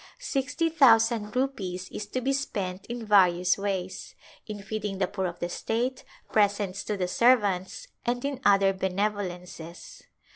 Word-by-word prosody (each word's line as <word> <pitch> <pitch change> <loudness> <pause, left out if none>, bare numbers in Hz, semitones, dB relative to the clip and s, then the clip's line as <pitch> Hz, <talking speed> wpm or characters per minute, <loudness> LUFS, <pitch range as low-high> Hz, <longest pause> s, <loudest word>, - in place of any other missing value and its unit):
Sixty 330 - -1
thousand 225 -7 +4
rupees 190 -9 -2
is 210 - -6
to 255 +4 -3
be 270 +2 +1
spent 195 -9 -3
in 235 -1 -5
various 180 -3 +4
ways; 190 -2 -4 0.3
in 210 -2 -7
feeding 210 -1 -4
the 190 - +2
poor 190 0 -3
of 175 - -6
the 175 - -3
state, 235 +8 -2 0.3
presents 205 -2 +1
to 210 - -2
the 180 -1 -1
servants, 205 - +2 0.2
and 245 +2 -1
in 280 -2 -3
other 195 -1 +5
benevolences. 190 - -4
205 Hz, 145 wpm, -27 LUFS, 185-240 Hz, 0.3 s, other